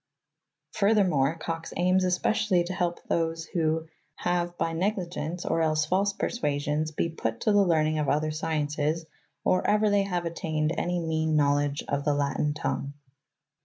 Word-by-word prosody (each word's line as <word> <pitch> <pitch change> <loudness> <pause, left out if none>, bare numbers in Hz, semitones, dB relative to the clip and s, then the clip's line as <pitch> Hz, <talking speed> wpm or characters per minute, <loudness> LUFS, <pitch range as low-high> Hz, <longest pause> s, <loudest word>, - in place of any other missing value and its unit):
Fur 210 +1 +2
thermore, 165 -7 +2
Cox 165 0 -5
aims 185 +2 +3
especially 180 0 +2
to 175 +2 -4
help 175 -2 -2
those 165 -1 -1
who 160 -1 -1 0.2
" - - -45
haue 175 -1 0
by 165 0 -1
necly 185 +3 0
gence 170 +1 -5
or 165 - +1
els 155 -1 +2
false 195 +5 +1
parsuasyons 150 -6 -1
be - - +1
put 115 -8 -3
to 215 - +2
the 205 -1 +5
lernynge 155 -3 +2
of 145 - 0
other 155 +1 +1
scyences 155 0 -1 0.4
or 185 - +3
euer 210 0 +2
they 200 -1 +3
haue 180 -3 -1
attayned 160 -1 -1
any 175 0 -1
meane 160 -1 0
knowledge 145 -1 +2
of 140 0 -1
the 145 -1 +1
latyne 145 +1 0
tongue. 140 -1 -3
165 Hz, 165 wpm, -27 LUFS, 150-180 Hz, 0.4 s, the